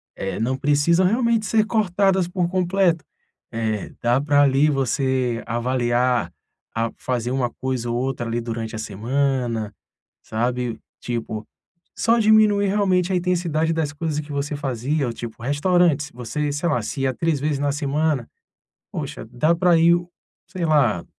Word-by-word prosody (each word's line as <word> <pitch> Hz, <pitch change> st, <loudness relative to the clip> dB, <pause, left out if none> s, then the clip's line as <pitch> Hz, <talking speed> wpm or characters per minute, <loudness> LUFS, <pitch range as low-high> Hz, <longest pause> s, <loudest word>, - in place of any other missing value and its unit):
eh, 95 Hz, -, -4 dB
não 120 Hz, +4 st, 0 dB
precisam 145 Hz, +6 st, +3 dB
realmente 230 Hz, +2 st, +2 dB
ser 220 Hz, -1 st, +3 dB
cortadas 195 Hz, -4 st, +2 dB
por 180 Hz, -1 st, -1 dB
completo. 180 Hz, -2 st, +1 dB, 0.5 s
Eh, 110 Hz, -3 st, -2 dB
dá 120 Hz, +2 st, +2 dB
pra 145 Hz, 0 st, +4 dB
ali 140 Hz, +2 st, +4 dB
você 130 Hz, -3 st, 0 dB
avaliar, 120 Hz, +1 st, 0 dB, 0.4 s
a 115 Hz, 0 st, 0 dB
fazer 125 Hz, -1 st, -2 dB
uma 130 Hz, -2 st, 0 dB
coisa 130 Hz, -1 st, -3 dB
ou 120 Hz, -, -1 dB
outra 130 Hz, -1 st, -2 dB
ali 115 Hz, +1 st, -1 dB
durante 115 Hz, -1 st, -4 dB
a -, -, -5 dB
semana, 115 Hz, 0 st, -1 dB, 0.5 s
sabe? 120 Hz, +1 st, -2 dB, 0.2 s
Tipo, 115 Hz, -3 st, -4 dB, 0.5 s
só 235 Hz, +1 st, +2 dB
diminuir 215 Hz, -2 st, +4 dB
realmente 190 Hz, -2 st, +1 dB
a -, -, +2 dB
intensidade 170 Hz, -3 st, 0 dB
das 160 Hz, -3 st, -1 dB
coisas 155 Hz, 0 st, -2 dB
que 150 Hz, 0 st, -7 dB
você 145 Hz, +1 st, -2 dB
fazia, 140 Hz, +1 st, -1 dB
ou 120 Hz, -, -3 dB
tipo, 115 Hz, -1 st, -8 dB
restaurantes: 150 Hz, +1 st, +2 dB
você, 135 Hz, +5 st, -3 dB
sei 145 Hz, +4 st, -1 dB
lá, 120 Hz, -6 st, +1 dB
se 120 Hz, +5 st, -4 dB
ia 135 Hz, -1 st, +1 dB
3 160 Hz, +2 st, 0 dB
vezes 145 Hz, 0 st, -1 dB
na 145 Hz, 0 st, +1 dB
semana, 145 Hz, -2 st, -1 dB, 0.6 s
poxa, -, -, -5 dB
dá 155 Hz, +7 st, +2 dB
pra 175 Hz, 0 st, +4 dB
ir 170 Hz, +1 st, +5 dB
o 175 Hz, 0 st, -4 dB, 0.4 s
sei 185 Hz, -3 st, -3 dB
lá, 135 Hz, -, +2 dB
145 Hz, 155 wpm, -22 LUFS, 120-170 Hz, 0.6 s, ir